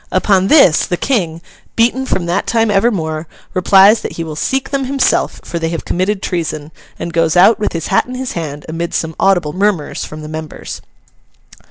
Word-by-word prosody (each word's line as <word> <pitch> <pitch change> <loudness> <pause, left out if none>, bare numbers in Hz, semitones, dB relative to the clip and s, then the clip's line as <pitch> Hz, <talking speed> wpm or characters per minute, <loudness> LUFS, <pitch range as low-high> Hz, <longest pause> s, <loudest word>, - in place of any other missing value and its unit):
Upon 190 0 +2
this, 195 - +5
the 175 - -1
King, 170 -11 -1 0.3
beaten 245 +3 +1
from 175 - -1
that 175 +3 -1
time 225 -2 +2
evermore, 170 -7 0 0.3
replies 195 +3 +5
that - - -5
he 165 - -4
will 155 -2 -6
seek 265 - -2
them 275 -1 -1
himself, 270 0 0
for 170 - -4
they 165 0 -1
have 165 -1 -4
committed 190 +2 -1
treason; 155 -3 -3 0.3
and 170 - -5
goes 165 +1 +2
out, 210 +5 +6
with 210 - -1
his 165 -2 -3
hat - - +2
in 255 - -7
his 260 0 -4
hand, 150 -4 -5
amid 165 +1 -4
some 160 0 -2
audible 175 -6 +2
murmurs 190 -5 -1
from 155 0 -8
the - - -7
members. 155 0 -7
180 Hz, 190 wpm, -15 LUFS, 160-210 Hz, 0.3 s, out